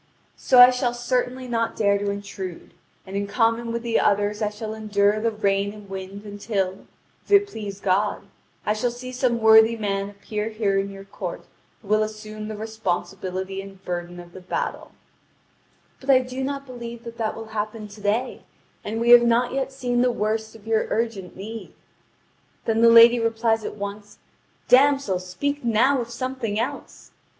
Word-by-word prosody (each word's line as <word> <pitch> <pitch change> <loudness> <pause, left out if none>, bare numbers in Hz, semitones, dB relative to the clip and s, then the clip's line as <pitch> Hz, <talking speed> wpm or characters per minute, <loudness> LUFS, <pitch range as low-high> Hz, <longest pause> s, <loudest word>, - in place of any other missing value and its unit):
So 255 - +3
I 245 +1 +11
shall 250 -1 -1
certainly 250 +1 -1
not 230 -1 -1
dare 200 -2 +2
to 200 0 -2
intrude, 200 -3 -6 0.3
and 190 0 -8
in 200 0 -1
common 230 +2 +1
with 235 0 -3
the 230 -1 +1
others 205 +1 +1
I 210 - +1
shall 215 +1 -6
endure 210 -1 +1
the 230 +1 +1
rain 200 -2 0
and 210 -1 -12
wind 195 +1 -7
until, 200 -2 -3 0.4
if - - -27
it 405 0 +6
please 205 - -7
God, 200 +2 0 0.4
I 210 - +2
shall 215 +3 0
see 250 +1 -8
some 250 -2 0
worthy 220 +1 +6
man 200 -2 -2
appear 210 +1 -4
here 210 -3 0
in 195 0 -2
your 195 0 -10
court 195 - -6 0.4
who - - -15
will 215 +1 +3
assume 215 0 -5
the 215 -1 -6
responsibility 190 -3 -3
and 195 -1 -13
burden 175 0 -4
of 175 0 -12
the 185 - -11
battle; 180 - -4 1.1
but 270 - -11
I 270 - +8
do 255 +1 -3
not 275 +1 -3
believe 235 -2 -8
that 235 -1 -9
that 220 -1 -1
will 225 0 -8
happen 215 0 -4
to 205 +1 -13
day, 220 +5 -1 0.4
and 220 +2 -3
we 235 +1 +3
have 240 0 +10
not 235 +1 +2
yet 270 0 -1
seen 245 -2 -1
the 250 0 +3
worst 220 -1 -2
of 220 -1 -15
your 225 -1 +1
urgent 220 -5 -2
need." 220 +4 -8 0.9
Then 225 0 +1
the 230 - +7
lady 230 +1 +8
replies 225 -1 +1
at - - -5
once: 205 +1 -7 0.5
"Damsel, 270 -7 +4
speak 285 +11 -3
now 240 +4 +3
of 235 - -6
something 245 -3 -3
else! 270 +5 -5
220 Hz, 180 wpm, -24 LUFS, 200-235 Hz, 1.1 s, I